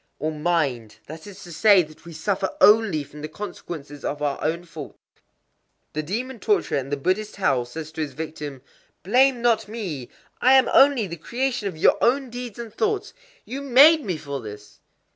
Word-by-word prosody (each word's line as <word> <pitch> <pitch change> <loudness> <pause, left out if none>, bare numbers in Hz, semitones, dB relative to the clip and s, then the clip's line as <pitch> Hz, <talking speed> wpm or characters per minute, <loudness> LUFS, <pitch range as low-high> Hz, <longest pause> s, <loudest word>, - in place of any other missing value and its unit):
Or 155 +1 -2
"mind." 150 -9 -1
That 160 +4 -10
is 200 -1 -11
to 175 - -11
say 200 +1 +5
that 155 +1 -16
we 170 - -10
suffer 190 +4 -1
only 210 - +5
from 150 +1 -13
the 155 - -4
consequences 155 -6 -8
of 145 - -3
our 145 -2 -2
own 165 +3 -1
faults.—The 155 -1 -12
demon 235 - -4
torturer 405 - +1
in 135 0 -7
the 145 - -1
Buddhist 190 +9 -1
hell 135 -11 +1
says 155 +5 -8
to 160 - -5
his 150 - -4
victim:—"Blame 160 - -2
not 225 -3 +2
me!—I 210 - -2
am 265 -1 +5
only 270 -5 +5
the 170 -2 -7
creation 245 - -2
of 185 - -6
your 160 - +4
own 260 +1 +2
deeds 245 -3 -7
and 235 -3 -8
thoughts: 430 - -1 0.3
you 270 +3 -6
made 280 +4 +6
me 185 -7 -2
for 140 -3 -6
this!" 105 -1 -11
175 Hz, 175 wpm, -23 LUFS, 150-235 Hz, 0.3 s, made